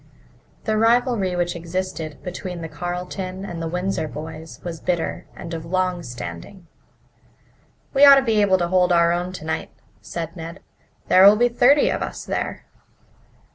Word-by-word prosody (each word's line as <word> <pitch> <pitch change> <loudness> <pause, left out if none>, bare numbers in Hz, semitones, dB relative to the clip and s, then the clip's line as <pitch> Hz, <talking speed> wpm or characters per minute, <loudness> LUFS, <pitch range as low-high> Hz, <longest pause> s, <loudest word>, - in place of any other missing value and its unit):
The 215 -2 0
rivalry 230 -5 +2
which 175 0 -1
existed 170 -2 -4
between 180 -1 -6
the - - -4
Carleton 180 +4 -5
and 170 -3 -6
the 165 - -2
Windsor 180 -1 -2
boys 160 +2 -8
was 170 -2 -5
bitter 175 -1 -2
and 170 -1 -8
of 165 -1 -4
long 185 +1 -1
standing. 120 - -8 1.3
"We 275 0 +4
ought 280 -1 +11
to 275 - +3
be 220 -4 +2
able 190 -2 +4
to 175 -1 0
hold 180 -1 +3
our 170 -1 +4
own 175 +1 -1
tonight," 160 -3 -4 0.3
said 165 0 -6
Ned. 165 +2 -8 0.5
"There'll 195 +3 +8
be 240 +3 +3
thirty 270 +4 +4
of - - -2
us - - -5
there." - - -3
180 Hz, 155 wpm, -22 LUFS, 165-195 Hz, 1.3 s, ought